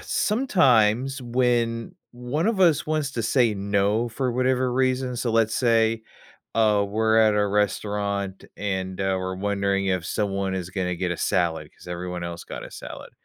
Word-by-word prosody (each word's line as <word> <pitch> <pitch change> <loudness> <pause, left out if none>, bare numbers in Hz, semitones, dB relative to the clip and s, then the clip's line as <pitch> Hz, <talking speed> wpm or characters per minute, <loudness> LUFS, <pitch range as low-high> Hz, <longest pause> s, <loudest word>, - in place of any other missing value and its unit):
sometimes 135 - +2
when, 120 +1 0 0.2
one 125 +8 -2
of 225 -3 +1
us 165 -6 +4
wants 155 -2 -1
to 115 -3 -2
say 120 0 +3
"no" 100 +3 0
for 125 +2 -2
whatever 130 0 +1
reason 130 0 0
so 120 0 -1
let's 110 -1 +2
say, 115 -2 +2 0.5
uh, 105 -2 +3
we're 110 +2 +2
at 110 -1 +4
a 105 0 +2
restaurant 100 -1 -1
and, 95 -2 -3
uh, 95 0 +1
we're 95 0 -3
wondering 100 0 0
if 90 -3 0
someone 100 -2 -1
is 90 -1 -4
gonna 90 -1 -2
get 90 0 -2
a - - -4
salad, 80 -4 0
'cause - - -17
everyone 90 0 -5
else 85 0 -6
got - - -7
a - - -11
salad. - - -9
110 Hz, 170 wpm, -24 LUFS, 95-125 Hz, 0.5 s, us